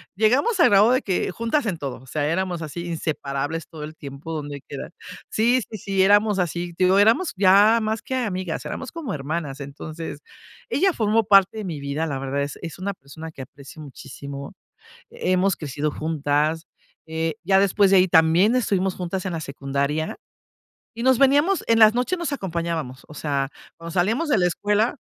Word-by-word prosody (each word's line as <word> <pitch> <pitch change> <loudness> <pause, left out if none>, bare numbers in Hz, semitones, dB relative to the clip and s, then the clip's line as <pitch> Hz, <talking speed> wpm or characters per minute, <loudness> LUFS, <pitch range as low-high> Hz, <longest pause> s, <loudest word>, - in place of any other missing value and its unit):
llegamos 255 - +2
al - - +6
grado 205 +4 +5
de 255 - +3
que 185 -1 -1
juntas 230 +7 -1
en 185 -6 -1
todo, 135 -4 -5
o - - -16
sea, 145 +2 -1
éramos 180 -1 -1
así 170 +3 -6
inseparables 155 -2 -3
todo 155 -2 -9
el 155 +1 -8
tiempo 140 +2 -8
donde 145 -2 -5
quiera. 140 - -8 0.4
Sí 240 +3 +3
sí 215 - -6
sí 195 0 +1
éramos 205 +1 +4
así. 175 0 -2
Te 185 - 0
digo, 190 +2 +4
éramos 230 - +3
ya 200 +4 +5
más 215 0 -2
que 260 - -5
amigas, 185 -8 -2
éramos 265 - -5
como 295 - -5
hermanas. 145 0 -4
Entonces 150 +2 -7 0.5
ella 375 +3 +2
formó 220 0 +2
parte 195 0 +5
de 210 - -5
mi 160 -5 -4
vida. 140 +3 -2
La 140 -4 -3
verdad 135 +1 -2
es 145 - -6
es 170 0 -7
una 200 +1 -2
persona 160 +1 -10
que 135 - -10
aprecio 140 +4 -12
muchísimo. 140 0 -9 0.6
Hemos 185 +1 +1
crecido 150 0 -3
juntas, 155 +1 -1 0.4
eh, 160 0 -2
ya 190 +1 +4
después 200 0 +3
de 190 - +7
ahí 185 0 +4
también 170 +9 +4
estuvimos 195 -5 0
juntas 185 +1 -4
en 180 - -2
la 160 - -3
secundaria 140 +2 -2 0.8
y 235 - -3
nos 260 -2 +4
veníamos 290 +7 +4
en 230 0 +4
las 215 0 +8
noches 255 +9 0
nos 340 -3 -3
acompañábamos. 170 - -3
O - - -10
sea, 140 -2 -2 0.3
cuando 165 0 -8
salíamos 225 - 0
de 245 - +3
la 180 -1 +3
escuela. 210 - 0
175 Hz, 185 wpm, -23 LUFS, 150-215 Hz, 0.8 s, las